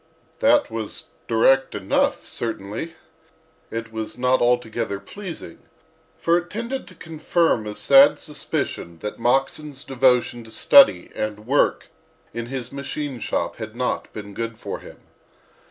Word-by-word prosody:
That 290 +1 +4
was 110 -2 -5 0.2
direct 135 +3 +3
enough, 100 -2 0
certainly. 115 +8 -4 0.7
It 115 0 -5
was 110 +1 -4
not 125 +1 +2
altogether 120 -4 0
pleasing, 165 - -9 0.6
for 170 +1 +3
it 175 0 -11
tended 235 +6 -4
to 185 - -14
confirm 160 -7 0
a 105 - -5
sad 275 - +6
suspicion 85 - -4
that 105 - -5
Moxon's 135 +4 0
devotion 125 -3 +2
to 110 - -12
study 275 - +6
and 105 0 -4
work 140 +4 +1 0.4
in 120 0 -4
his 125 -1 -5
machine 140 -1 -5
shop - - -2
had 110 - -7
not 125 +1 -2
been 100 -1 -8
good 115 +1 -4
for - - -6
him. - - -14
125 Hz, 135 wpm, -23 LUFS, 110-155 Hz, 0.7 s, sad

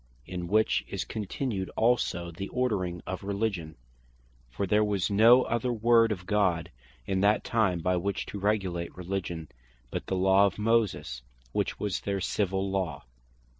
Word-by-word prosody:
In 90 +2 -5
which 110 +4 +2
is - - -2
contained 105 -2 -3
also 90 -7 +1
the 95 +4 -6
ordering 100 -9 -1
of 95 +1 -5
Religion; 100 -5 -2 0.7
for 100 +11 -2
there 105 +3 +3
was 100 -3 0
no 115 +5 +7
other 120 +2 -1
Word 115 0 +4
of 90 -3 -4
God 95 -5 +1 0.3
in 95 +5 0
that 105 +2 +3
time, 100 -7 +1
by 90 +2 +1
which 100 +3 -2
to 100 - -6
regulate 95 -5 -1
Religion, 90 -3 -4 0.4
but - - -4
the 95 - -1
Law 95 +2 +5
of 95 - -5
Moses, 100 - 0 0.3
which - - -1
was 105 -2 -2
their 100 -1 -2
Civill 95 0 -1
Law. 95 -3 -2
100 Hz, 155 wpm, -28 LUFS, 90-110 Hz, 0.7 s, no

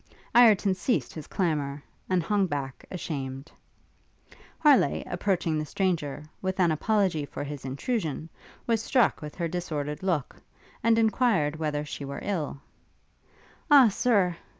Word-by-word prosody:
Ireton 215 -5 +6
ceased 200 +7 -1
his 155 -3 -8
clamour, 150 -6 -1 0.3
and 185 -2 +2
hung 200 +1 +1
back, 140 -4 -4
ashamed. 140 -5 -5 1.1
Harleigh, 285 - +4
approaching 175 -4 -1
the 155 - -3
stranger, 155 -7 -1 0.2
with 190 0 -2
an 175 -3 +4
apology 185 -1 +1
for 145 - -6
his 145 -2 -7
intrusion, 155 - -2 0.4
was 230 -2 +1
struck 250 +1 +2
with 150 -1 -8
her 170 -2 -2
disordered 150 -4 -4
look, 170 -8 -1 0.5
and 225 0 +4
enquired 220 - +2
whether 150 -2 -2
she 145 - -6
were 140 0 -5
ill? 165 -9 -2 1.1
'Ah, 275 -5 +8
Sir!' 200 -6 +2
170 Hz, 130 wpm, -27 LUFS, 145-205 Hz, 1.1 s, Ah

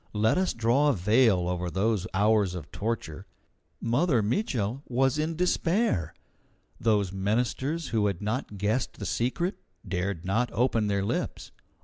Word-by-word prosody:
Let 110 +1 +2
us 185 0 +1
draw 120 +6 +2
a - - +3
veil 105 -1 +3
over 90 0 -2
those 100 +1 0
hours 100 -1 +2
of 75 -5 -8
torture. 100 -5 -4 0.5
Mother 125 0 +2
Mitchel 120 - -1
was 135 +3 +1
in 160 +2 -1
despair. 175 - +1 0.6
Those 105 -4 +2
ministers 125 - -1
who 110 -3 +1
had 100 -4 -2
not 105 0 -3
guessed 105 +6 0
the - - -6
secret 170 - -1 0.3
dared 90 -1 -2
not 115 +6 +1
open 115 -3 +1
their 100 -1 0
lips. - - -3
110 Hz, 140 wpm, -27 LUFS, 100-130 Hz, 0.6 s, a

